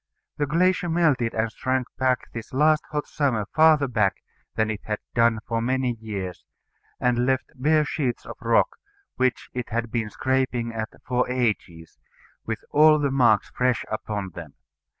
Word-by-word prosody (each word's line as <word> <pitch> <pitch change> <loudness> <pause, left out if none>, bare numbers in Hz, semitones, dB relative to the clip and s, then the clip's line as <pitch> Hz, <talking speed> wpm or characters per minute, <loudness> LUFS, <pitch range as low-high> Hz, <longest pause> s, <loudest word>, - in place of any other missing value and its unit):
The 145 - 0
glacier 180 +3 +2
melted 155 -9 +2
and 110 0 0
shrank 130 +2 -1 0.5
this 115 -1 -7
last 150 +3 +3
hot 150 -1 -2
summer 125 -8 0
farther 155 -3 +5
back 105 -6 +1 0.4
than 110 0 +1
it 105 - -5
had 105 0 -2 0.2
done 115 -1 +3
for 115 0 -1
many 130 +1 0
years, 100 -5 -5 0.6
and 125 0 +1
left 130 0 0
bare 150 +3 +2
sheets 135 -5 -2
of - - -8
rock, - - +2 0.4
which 130 -2 0
it 125 -1 -4
had 115 0 -2
been 115 -3 -1
scraping 130 -1 -1
at 110 0 -3 0.2
for 125 0 0
ages, 105 -10 -2 0.5
with - - -3
all 155 +1 +6
the 145 -2 0
marks 120 -6 +3
fresh 125 -2 0
upon 105 -3 -3
them. 80 -4 -10
125 Hz, 155 wpm, -24 LUFS, 110-140 Hz, 0.6 s, all